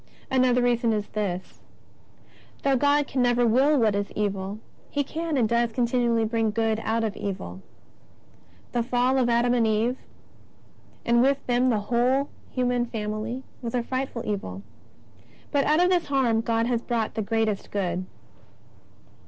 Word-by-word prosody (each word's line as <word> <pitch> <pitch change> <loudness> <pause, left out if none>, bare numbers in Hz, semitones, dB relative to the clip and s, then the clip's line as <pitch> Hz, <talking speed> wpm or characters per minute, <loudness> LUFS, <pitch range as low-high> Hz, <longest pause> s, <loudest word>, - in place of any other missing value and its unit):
Another 250 -1 +3
reason 240 -2 +2
is 210 -1 -2
this: 190 -4 -4 1.0
Though 275 -1 +3
God 285 +2 +3
can 260 -1 -1
never 245 0 +3
will 265 +6 +4
what 220 -5 +3
is 200 0 -2
evil. 200 -1 -2 0.3
He 285 - 0
can 320 +1 -3
and 235 -4 +3
does 235 +1 +1
continually 235 -2 +1
bring 225 0 0
good 220 0 0
out 225 +1 0
of 215 -2 -2
evil. 95 - -5 1.1
The 240 - 0
fall 250 +2 +1
of 245 -2 +2
Adam 240 +1 +3
and 235 -2 +3
Eve, 225 +4 +1 1.1
and 235 0 +4
with 275 +2 +2
them 245 0 +2
of - - +4
the 220 -4 +2 0.2
whole 260 +4 +2 0.2
human 245 -1 0
family, 220 +3 -4 0.2
was 235 -1 -4
a 245 - 0
frightful 255 -1 -3
evil, 100 - -4 0.9
but 285 -2 +2
out 305 +2 +3
of 360 - +3
this 355 -2 +1
harm 255 -5 +2
God 230 0 0
has 235 -1 0
brought 235 -3 -2
the 220 - -2
greatest 220 -1 -1
good. 185 -2 -2
235 Hz, 160 wpm, -25 LUFS, 215-255 Hz, 1.1 s, will